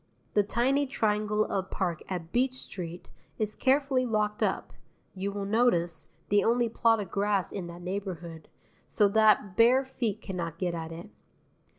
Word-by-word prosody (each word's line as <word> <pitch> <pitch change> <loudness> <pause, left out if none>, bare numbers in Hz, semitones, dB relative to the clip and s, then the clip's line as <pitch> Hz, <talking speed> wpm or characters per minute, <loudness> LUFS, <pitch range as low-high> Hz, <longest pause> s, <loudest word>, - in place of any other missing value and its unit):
The 210 - +5
tiny 260 +7 +1
triangle 215 -3 +1
of 190 -1 -2
park 175 -4 -2
at 175 -3 -4
Beach 255 +1 +1
Street 175 -8 -7 0.3
is 215 -1 -2
carefully 270 -1 +2
locked 215 -3 0
up, - - -1 0.4
you 195 +1 -3
will 200 0 -4
notice 185 -7 +1 0.2
the 205 0 +4
only 235 0 +2
plot 225 0 +3
of 200 - -5
grass 200 -1 0
in 185 -4 -5
that 170 +1 -9
neighbourhood 180 -4 -5 0.4
so 205 - +3
that 210 -2 +4
bare 250 +5 +5
feet 235 -5 -2
cannot 175 -6 -5
get 180 -1 -1
at 165 -1 -5
it. 170 +6 -9
205 Hz, 160 wpm, -29 LUFS, 180-230 Hz, 0.4 s, The